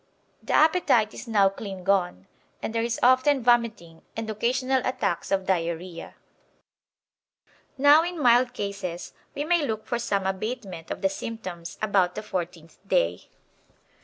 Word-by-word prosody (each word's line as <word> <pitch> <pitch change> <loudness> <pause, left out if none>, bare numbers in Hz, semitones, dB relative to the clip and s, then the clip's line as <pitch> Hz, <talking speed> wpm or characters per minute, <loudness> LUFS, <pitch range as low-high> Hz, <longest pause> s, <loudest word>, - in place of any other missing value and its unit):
The - - -4
appetite 310 -9 +3
is - - -9
now 205 -4 +4
clean 195 -1 -8
gone, 180 - 0 0.3
and 220 - -5
there 230 - 0
is 235 0 -2
often 255 +2 +4
vomiting 230 -9 +1 0.2
and 225 0 -3
occasional 255 +4 0
attacks 200 -8 -2
of 195 -1 0
diarrhoea. 170 -1 -3 1.6
Now 285 +3 +7
in 345 0 -4
mild 245 -1 +4
cases 195 -4 -5 0.2
we 285 - -2
may 340 0 +2
look 220 -5 -3
for 240 - -2
some 200 -5 -1
abatement 190 -3 -4
of - - -6
the 195 - +3
symptoms 185 -5 -7
about 195 -4 +2
the 215 - -5
fourteenth 170 -5 -6
day. 85 - 0
210 Hz, 140 wpm, -25 LUFS, 185-245 Hz, 1.6 s, Now